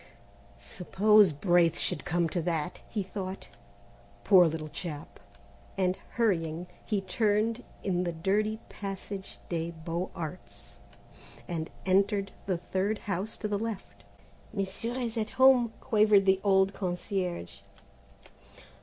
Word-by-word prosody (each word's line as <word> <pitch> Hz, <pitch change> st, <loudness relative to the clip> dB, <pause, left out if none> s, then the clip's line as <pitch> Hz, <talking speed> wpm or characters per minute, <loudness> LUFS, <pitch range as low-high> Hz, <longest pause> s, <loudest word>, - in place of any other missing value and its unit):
"Suppose 205 Hz, +2 st, +4 dB
Braith 170 Hz, +2 st, +3 dB
should -, -, -1 dB
come 175 Hz, 0 st, +1 dB
to 175 Hz, -, -1 dB
that," 165 Hz, 0 st, -2 dB
he 210 Hz, -3 st, -2 dB
thought; 190 Hz, 0 st, -6 dB, 0.7 s
"poor 185 Hz, -4 st, +7 dB
little 160 Hz, -1 st, -3 dB
chap;" 150 Hz, -1 st, -7 dB, 0.6 s
and 185 Hz, -1 st, +2 dB, 0.2 s
hurrying, 175 Hz, -7 st, 0 dB, 0.2 s
he 210 Hz, -3 st, -1 dB
turned 215 Hz, +4 st, +1 dB, 0.2 s
in 180 Hz, -2 st, 0 dB
the 175 Hz, -, -1 dB
dirty 210 Hz, +6 st, 0 dB
passage 195 Hz, -1 st, -6 dB
des 165 Hz, -1 st, -2 dB
Beaux 170 Hz, +2 st, -4 dB
Arts 170 Hz, +2 st, -8 dB, 0.7 s
and 165 Hz, -2 st, -3 dB, 0.2 s
entered 195 Hz, +1 st, +2 dB, 0.2 s
the 185 Hz, -3 st, +1 dB
third 190 Hz, +4 st, -1 dB
house 200 Hz, +2 st, -3 dB
to 215 Hz, -, -3 dB
the 205 Hz, -1 st, -1 dB
left. 225 Hz, -3 st, -6 dB, 0.5 s
"Monsieur 200 Hz, +4 st, -3 dB
is 240 Hz, -3 st, -3 dB
at 215 Hz, -1 st, -1 dB
home," 260 Hz, -3 st, +6 dB
quavered 215 Hz, -4 st, +4 dB
the 190 Hz, 0 st, +4 dB
old 195 Hz, -1 st, +4 dB
concierge. 180 Hz, -, -3 dB
190 Hz, 120 wpm, -29 LUFS, 175-210 Hz, 0.7 s, poor